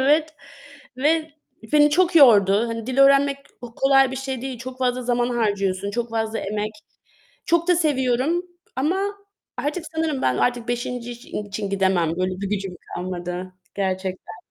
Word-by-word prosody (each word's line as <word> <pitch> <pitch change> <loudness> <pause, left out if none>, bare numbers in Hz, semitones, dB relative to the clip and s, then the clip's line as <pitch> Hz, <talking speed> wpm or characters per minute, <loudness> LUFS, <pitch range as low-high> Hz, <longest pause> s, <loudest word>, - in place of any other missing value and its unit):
evet 305 +3 +2 0.6
ve 315 +3 +1 0.4
beni 295 0 +6
çok 350 +2 +3
yordu. 215 - +6
Hani, 230 -1 -5
dil 260 +1 -3
öğrenmek 275 0 +5
h 275 -3 -13
kolay 270 -1 +4
bir - - -4
şey 265 -2 -4
değil. 265 -2 -5
Çok 255 +1 -8
fazla 255 -1 0
zaman 245 0 +1
harcıyorsun. 200 -4 0
Çok 240 +1 -2
fazla 225 0 -2
emek. 210 +1 -3 0.7
Çok 340 +1 +2
da 355 - +5
seviyorum 285 +1 +1 0.3
ama 310 +8 +1 0.6
artık 305 +4 -2
sanırım 320 -4 -1
ben 130 -1 +2
artık 240 -1 0
5. 245 0 -3
i 240 -2 -7
için 200 0 -4
gidemem. 190 -4 +2
Böyle 185 0 0
bir 200 - -2
gücüm 195 -3 -3 0.2
kalmadı 180 0 -5 0.2
gerçekten. 185 -2 -3
245 Hz, 155 wpm, -23 LUFS, 200-275 Hz, 0.7 s, beni